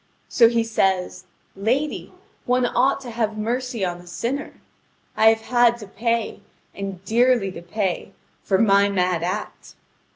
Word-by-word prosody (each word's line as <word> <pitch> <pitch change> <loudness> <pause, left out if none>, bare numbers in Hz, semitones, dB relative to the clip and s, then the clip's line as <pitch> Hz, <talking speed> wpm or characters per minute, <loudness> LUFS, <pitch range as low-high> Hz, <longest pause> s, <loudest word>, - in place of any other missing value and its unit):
So 230 -2 +5
he 230 -1 +1
says: 190 -4 -1 0.3
"Lady, 250 +10 -1 0.4
one 250 0 +2
ought 265 +3 +1
to 245 -3 -8
have 220 -2 -2
mercy 235 0 -2
on 175 -1 -3
a 175 - -15
sinner. 235 +10 -4 0.6
I 220 - +4
have 225 0 +4
had 240 0 +3
to 215 - -9
pay, 230 +3 -2 0.3
and 195 -2 -7
dearly 235 -2 +2
to 170 - -9
pay, 190 +1 -3 0.3
for 190 - +1
my 200 -1 +4
mad 180 -3 0
act. 185 +5 -5
220 Hz, 150 wpm, -22 LUFS, 195-240 Hz, 0.6 s, So